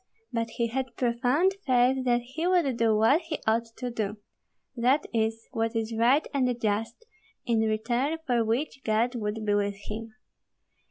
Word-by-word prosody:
But 230 -1 -1
he 235 - +2
had 255 0 -3
profound 250 +9 +2
faith 255 0 +3
that 240 -1 +3
he 275 +8 -3
would 345 -8 +2
do 230 -2 +2
what 250 +10 +4
he 325 -2 -4
ought 225 +1 +2
to 250 -1 -4
do, 215 -2 -3 0.6
that 255 +5 +2
is, 225 0 -1
what 225 -2 -1
is 225 0 -1
right 245 +7 +4
and 250 -3 +1
just, 225 - -2 0.4
in 235 -2 +2
return 240 +7 0
for 240 -4 +2
which 255 +4 -2
God 225 +3 +1
would 215 -2 -3
be 205 - +2
with 205 0 0
him. 220 +2 -8
235 Hz, 165 wpm, -27 LUFS, 225-260 Hz, 0.6 s, what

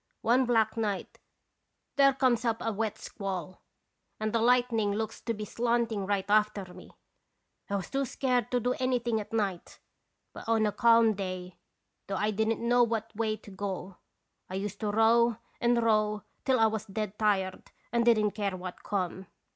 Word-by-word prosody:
One 245 +3 +3
black 225 -3 +2
night 210 -3 -3 0.8
there 275 -1 +6
comes 255 -3 +2
up 230 -2 +1
a 225 - -1
wet 215 0 -2
squall, 185 -3 -6 0.6
and 215 0 -2
the 230 - +2
lightning 235 -3 +3
looks 220 +1 -3
to 230 - -2
be 210 0 -5
slanting 230 -3 0
right 200 -2 0
after 210 -1 +2
me. - - -13 0.8
I 200 - -1
was 190 -3 -4
too 275 0 0
scared 250 -1 0
to 250 - +1
do 245 +2 0
anything 245 -3 +1
at 205 - -11
night, 200 -6 -2 0.6
but - - -8
on 225 -1 +3
a 210 - +1
calm 230 0 +5
day, 185 -2 -6 0.5
though 195 - -2
I 210 +3 +1
didn't 220 +2 0
know 245 +1 +4
what 225 -1 0
way 215 0 -1
to 205 - -14
go, 190 -1 -5 0.5
I 185 - -5
used 200 +1 -4
to 210 - -1
row 225 +2 +4 0.2
and 235 0 +2
row 215 -2 +2 0.2
till 260 -2 +3
I 225 - +6
was 220 0 -1
dead 210 0 -4
tired 195 -3 0 0.2
and 235 0 +2
didn't 215 -3 +4
care 200 -3 -2
what 180 0 -8
come. 190 -2 -3
220 Hz, 175 wpm, -29 LUFS, 200-235 Hz, 0.8 s, there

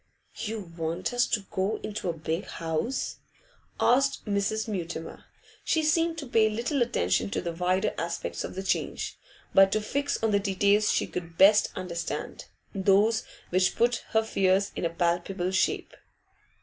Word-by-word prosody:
'You 210 -6 -5
want 165 +5 -2
us 245 0 +3
to 210 - 0
go 195 +3 0
into 210 -3 -3
a - - 0
big 160 +3 -3
house?' 165 +11 -2 0.6
asked 270 +3 +3
Mrs. 210 +2 0
Mutimer. 170 -5 -5 0.4
She 320 -1 +1
seemed 330 +2 +2
to 300 - -5
pay 225 -3 +3
little 240 +6 -1
attention 95 - +1
to - - -2
the 170 - -3
wider 180 +2 0
aspects 170 0 -3
of - - -6
the 190 - -4
change, - - -2 0.3
but 195 0 +6
to 215 - +2
fix 280 +7 -1
on 225 - +3
the 200 - +3
details 200 +1 +2
she - - +1
could 170 -2 -7
best 205 +2 +6
understand, 175 -3 -4 0.3
those 200 +3 +3 0.3
which 185 +1 +2
put 235 +1 +2
her 220 0 +2
fears 195 -2 +2
in 170 - -1
palpable 175 +2 0
shape. 190 - 0
195 Hz, 155 wpm, -27 LUFS, 175-220 Hz, 0.6 s, but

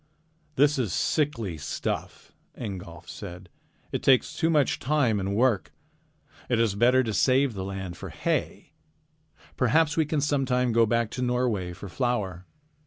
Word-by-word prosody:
"This 145 +1 +3
is 115 -8 0
sickly 115 - 0
stuff," - - -4 0.2
Ingolf 90 -6 -7
said. 90 -2 -9 0.4
"It - - -2
takes 130 -2 +3
too 165 - +1
much 150 -5 +2
time 130 -7 +1
and 100 +1 -2
work. 120 -3 +2 0.8
It 120 -2 +2
is 115 -3 +2
better 125 +5 +4
to 110 -3 -3
save 130 +5 +3
the 95 -2 -5
land 95 -2 -5
for - - -7
hay. - - -2 0.9
Perhaps 160 -1 +2
we 160 - +3
can 155 -1 0
sometime 135 -4 +1
go 115 0 +4
back 115 0 0
to 125 - -4
Norway 120 -7 0
for 100 +3 -9
flour." 95 -5 -2
120 Hz, 150 wpm, -26 LUFS, 100-135 Hz, 0.9 s, better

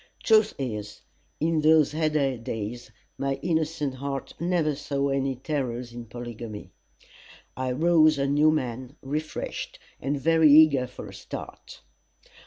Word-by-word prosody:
Truth 220 -1 +4
is, 105 -6 -5 0.4
in 160 0 +1
those 155 -1 +5
heyday 150 -3 +1
days, 115 +1 -5 0.3
my 135 0 0
innocent 160 -4 -1
heart 135 +1 -5
never 170 -3 +1
saw 140 0 -2
any 135 -1 0
terrors 125 -3 -3
in 120 0 -7
polygamy. 115 -4 -8 0.8
I 130 -1 -2
rose 155 +1 +4
a 140 - +1
new 145 +2 +4
man, 130 -3 -2
refreshed 150 +3 -4 0.2
and 140 +2 -2
very 160 +1 +5
eager 145 -4 +6
for - - -9
a - - -12
start. - - -9
140 Hz, 130 wpm, -26 LUFS, 125-155 Hz, 0.8 s, eager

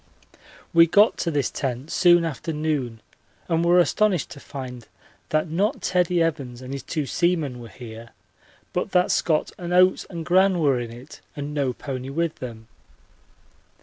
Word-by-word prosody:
We 165 0 +7
got 205 +6 +5
to 170 - 0
this 145 -4 0
tent 135 +2 -4
soon 175 -2 +5
after 160 0 -4
noon 150 -7 -2 0.5
and 165 -1 +1
were 175 +1 +4
astonished 185 0 +2
to - - -9
find 130 -5 -8 0.4
that 155 +2 +1
not 185 +7 0
Teddie 180 -2 +2
Evans 135 -7 -3
and 130 +1 -6
his 140 - -4
two 155 +3 -3
seamen 160 -5 0
were 120 - -9
here, 115 -1 -10 0.6
but 180 +2 -2
that 180 -1 +3
Scott 155 -2 +1
and 175 0 -4
Oates 185 +1 +4
and 170 -3 -6
Gran 185 +2 +4
were 140 -6 +2
in 120 -1 -5
it 125 +5 -12
and 145 0 -5
no 140 -3 0
pony 130 0 -6
with 165 +3 -2
them. 115 -3 -8
155 Hz, 165 wpm, -24 LUFS, 130-175 Hz, 0.6 s, We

